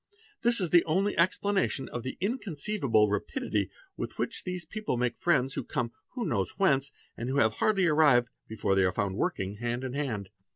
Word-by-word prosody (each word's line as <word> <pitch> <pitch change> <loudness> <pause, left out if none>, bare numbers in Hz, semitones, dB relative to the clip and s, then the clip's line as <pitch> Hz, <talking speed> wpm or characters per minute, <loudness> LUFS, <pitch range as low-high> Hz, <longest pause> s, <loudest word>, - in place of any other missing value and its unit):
This 235 0 +4
is 180 -4 0
the 175 -1 +6
only 190 +6 +1
explanation 185 -3 +1
of 120 - -4
the 130 +2 -5
inconceivable 185 - +1
rapidity 105 -1 -1 0.3
with - - -5
which - - -2
those 180 -2 -4
people 215 - -3
make 120 -1 0
friends 135 -6 +2
who - - -2
come 120 -2 -2 0.3
no - - -2
one 185 - -2
knows 100 -7 -1
whence, 140 -8 +2 0.2
and 120 +2 -4
who 135 - 0
have 110 -5 +3
hardly 195 -4 +3
arrived 145 -7 +4 0.2
before 110 -3 -1
they 95 0 +4
are. 90 - +3
found 100 -2 -1
working 95 +1 -2
hand 120 +2 -2
in 130 -1 -4
hand. 115 -9 -3
135 Hz, 195 wpm, -29 LUFS, 115-180 Hz, 0.3 s, the